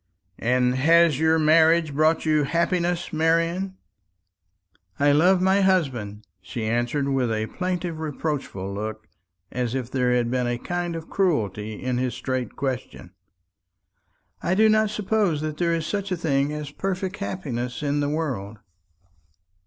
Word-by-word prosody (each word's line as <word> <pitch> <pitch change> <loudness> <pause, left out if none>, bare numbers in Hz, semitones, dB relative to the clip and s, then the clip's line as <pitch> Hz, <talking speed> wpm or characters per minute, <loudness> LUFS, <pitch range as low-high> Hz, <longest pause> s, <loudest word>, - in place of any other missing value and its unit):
"And 125 +1 +2
has 160 +2 +4
your 160 0 +3
marriage 160 0 +4
brought 155 +3 +2
you 155 -1 +3
happiness, 170 +3 0
Marian?" 165 +4 +1 1.2
"I 145 0 +4
love 180 +5 +4
my 190 +1 +3
husband," 125 - 0 0.2
she 110 +4 -5
answered 120 +5 0
with 130 -4 0
a 110 0 -1
plaintive 180 +2 -3
reproachful 145 -10 -4
look, 110 +1 -5 0.5
as 125 0 -2
if 130 -2 -4
there 125 -2 +1
had 120 -1 +1
been 125 -1 0
a 120 0 -1
kind 175 +4 -3
of 165 -1 -7
cruelty 110 - -1
in 125 +3 -2
his 125 -2 -1
straight 130 -1 -3
question. 130 -9 -4 1.3
"I 185 - 0
do 220 +2 +5
not 215 0 +3
suppose 205 -6 0
that 155 -1 -4
there 170 0 +1
is 165 -2 -3
such 200 0 -3
a 180 - 0
thing 145 -3 0
as 150 -1 -5
perfect 190 +3 -3
happiness 130 - -4
in 145 0 0
the 145 0 0
world." 125 -10 -3
150 Hz, 145 wpm, -24 LUFS, 125-170 Hz, 1.3 s, do